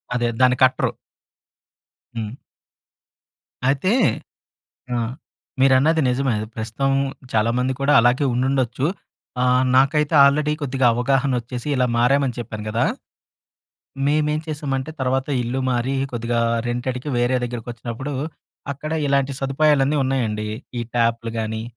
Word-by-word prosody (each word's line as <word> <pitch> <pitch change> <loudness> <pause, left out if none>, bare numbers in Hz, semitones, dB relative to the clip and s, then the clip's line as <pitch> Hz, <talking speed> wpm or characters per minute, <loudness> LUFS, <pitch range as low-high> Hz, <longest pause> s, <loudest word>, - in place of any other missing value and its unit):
అదే 120 -1 +1
దాన్ని 125 0 +4
కట్టరు. 130 0 +3 1.3
హ్మ్. 110 -1 -3 1.4
అయితే 145 +8 +1 1.0
అ! - - 0 0.6
మీరన్నది 135 +5 +4
నిజమే. 125 -1 +1 0.2
ప్రస్తుతం 115 +5 -2 0.4
చాలామంది 120 +4 +1
కూడా 140 +1 +3
అలాగే 125 +4 +3
ఉండుండొచ్చు. 130 +1 0 0.6
ఆహ్, 125 0 +3
నాకైతే 145 +4 +3
ఆల్రెడీ 150 +2 +3
కొద్దిగా 135 -3 0
అవగాహన 135 +3 +1
వచ్చేసి 125 +3 -6
ఇలా 125 -1 +2
మారామని 130 +1 +2
చెప్పాను 105 -2 -6
కదా! 115 +2 +1 1.2
మేమేం 150 +1 +1
చేసామంటే 145 -2 -3
తర్వాత 130 +1 0
ఇల్లు 120 +3 -2
మారి 125 +2 0 0.2
కొద్దిగా 115 0 -1 0.3
రెంటేడ్‌కి 125 +3 -3
వేరే 120 +1 +2
దగ్గరికి 120 -1 -6
వచ్చినప్పుడు, 120 +4 -6 0.6
అక్కడ 155 +3 -6
ఇలాంటి 140 0 +1
సదుపాయాలన్నీ 140 +1 +2
ఉన్నాయండి. 110 -5 -1 0.3
ఈ - - -1
ట్యాప్‌లు 115 -1 +1
కాని, 110 0 -3
130 Hz, 110 wpm, -21 LUFS, 120-140 Hz, 1.4 s, దాన్ని